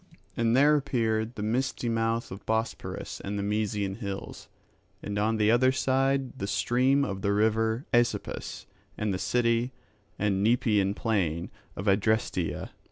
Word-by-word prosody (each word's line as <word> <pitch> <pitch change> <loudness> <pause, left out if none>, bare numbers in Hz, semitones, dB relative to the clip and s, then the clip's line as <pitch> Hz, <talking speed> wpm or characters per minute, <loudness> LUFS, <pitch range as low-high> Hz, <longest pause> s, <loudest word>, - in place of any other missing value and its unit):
And 115 +1 +2
there 145 +2 +6
appeared 115 -5 -1
the 105 - -4
misty 125 +3 -1
mouth 115 0 0
of 95 +2 -8
Bosporus 110 +1 -3
and 100 +1 -4
the 100 - -2
Mysian 105 -1 -1
hills; 100 -4 -6 0.6
and 105 0 -3
on 110 +2 +1
the 105 0 +3
other 130 +2 +4
side 135 0 0
the 100 - -2
stream 130 +6 +2
of 95 -1 -4
the 100 - +1
river 110 +4 +1
Aesepus 120 0 0 0.3
and 105 -2 -1
the 95 - -2
city 120 +2 +1 0.4
and 100 -1 +1
Nepeian 105 -4 +2
plain 90 -9 -1 0.2
of 95 - -5
Adrasteia. 100 -3 0
110 Hz, 145 wpm, -28 LUFS, 100-120 Hz, 0.6 s, there